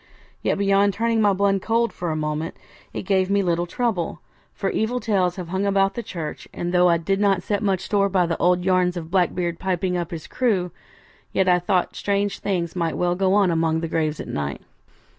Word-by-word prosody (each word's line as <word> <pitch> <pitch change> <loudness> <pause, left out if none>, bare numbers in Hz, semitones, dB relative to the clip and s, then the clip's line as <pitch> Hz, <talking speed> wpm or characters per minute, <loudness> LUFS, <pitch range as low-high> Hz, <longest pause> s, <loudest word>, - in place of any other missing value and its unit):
Yet - - 0
beyond 200 0 +3
turning 230 +1 +1
my 205 -1 +4
blood 195 0 +1
cold 230 +2 +1
for 175 - -4
a 155 - -1
moment, 155 +1 -3 0.4
it - - -5
gave 190 -1 +1
me 200 0 +2
little 175 -1 0
trouble, 200 -4 -2 0.3
for 195 - -2
evil 235 +3 0
tales 195 -6 +1
have 180 -3 -7
hung 190 +2 -1
about 195 -1 +2
the 235 - -4
church; 165 -8 -6
and 175 +1 -4
though 180 0 +5
I 170 - +4
did 195 +4 -1
not 195 -3 +2
set 205 -1 -1
much 195 -3 +1
store 200 -1 +1
by 185 -2 +2
the 165 -1 -2
old 180 0 +2
yarns 185 -1 +2
of 165 -1 -7
Blackbeard 175 -2 0
piping 185 -1 -1
up 170 -2 -3
his 165 -2 -7
crew, 195 -8 0 0.6
yet 190 - +2
I 180 -1 +5
thought 180 0 0
strange 200 0 -1
things 175 -4 -2
might 170 -2 -1
well 175 0 +1
go 190 +1 +2
on 200 -4 +4
among 160 -1 +1
the 165 - -2
graves 155 -1 -1
at - - -6
night. 70 -1 -4
185 Hz, 215 wpm, -23 LUFS, 170-200 Hz, 0.6 s, though